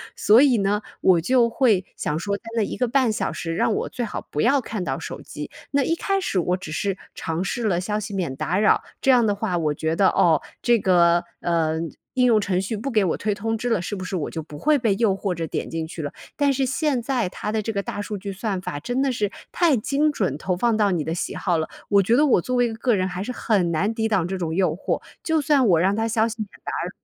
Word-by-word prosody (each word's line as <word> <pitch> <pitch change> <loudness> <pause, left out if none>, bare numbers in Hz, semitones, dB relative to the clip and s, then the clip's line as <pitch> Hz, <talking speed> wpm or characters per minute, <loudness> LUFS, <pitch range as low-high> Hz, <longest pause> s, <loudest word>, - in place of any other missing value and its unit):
所 220 +4 +6
以 265 -5 +5
呢， 200 +1 +1 0.2
我 180 -3 +4
就 240 +5 +3
会 225 -7 +2
想 150 - -2
说 200 +4 -2
在 - - -29
那 220 - +3
1 - - -3
个 250 - +1
半 255 -1 +2
小 215 - -1
时， 165 -1 -4
让 220 - +2
我 - - -2
最 245 - -3
好 215 - -6
不 150 - -1
要 275 +4 +4
看 215 -5 -4
到 - - -2
手 - - -7
机， - - -7 0.2
那 280 -1 +2
一 330 - +1
开 390 +3 0
始 195 - 0
我 180 +1 0
只 185 -4 -8
是 195 +4 -1 0.2
尝 165 +2 -3
试 235 +5 -3
了 175 -4 +1
消 210 +3 -2
息 215 0 -6
免 175 -9 -2
打 175 +6 -1
扰， 215 - +4 0.2
这 270 - +4
样 245 -3 +5
的 205 -2 +1
话 200 -3 -1
我 155 -3 0
觉 160 +2 -1
得， 190 +2 +4
哦， 160 -4 +3 0.2
这 240 -1 +3
个， 175 -2 +4 0.2
嗯， 165 -1 0 0.2
应 250 -1 +4
用 225 -3 +4
程 185 -2 0
序 195 +4 -3
不 230 +7 -4
给 215 -4 +3
我 170 - +1
推 210 0 -1
通 225 +3 -2
知 245 +2 -2
了， 225 -6 +1
是 190 +4 -4
不 185 - -6
是 185 - -4
我 155 - -3
就 160 - -5
不 150 -1 -10
会 305 0 +3
被 230 -6 +1
诱 220 -3 +3
惑 195 -1 -2
着 165 -1 -4
点 - - -4
进 165 -1 -3
去 165 - -7
了， 145 - -4 0.2
但 285 -1 +2
是 270 0 +1
现 265 0 0
在 240 -5 -1
它 210 - -5
的 220 0 0
这 225 - -3
个 200 -2 -1
大 205 - -5
数 210 0 -4
据 200 0 -6
算 195 -1 -2
法 145 - -5
真 245 - -2
的 275 - +2
是 205 -4 -1 0.2
太 330 -7 +3
精 280 +7 +1
准 185 - -1
投 180 +3 -2
放 235 +3 +2
到 210 -2 +2
你 170 -4 0
的 160 - -2
喜 - - -3
好 175 -4 0
了， 160 - -2 0.2
我 200 -1 +4
觉 230 +6 +3
得 300 - +5
我 255 -10 +4
作 255 +8 -2
为 245 0 +3
一 225 - -5
个 235 +2 +1
人 185 -1 0
还 180 0 -4
是 250 - -4
很 200 -8 +1
难 195 +7 0
抵 220 -1 0
挡 190 -6 +1
这 190 +1 -3
种 165 -3 -3
诱 180 -3 +1
惑， 185 - -2 0.2
就 320 -1 +1
算 285 -3 +3
我 170 -5 +4
让 190 +4 +2
它 225 +1 0
消 225 0 +2
息 230 - -5
免 205 - -5 0.2
打 - - -3
扰 - - -3
205 Hz, 295 characters per minute, -23 LUFS, 180-240 Hz, 0.2 s, 所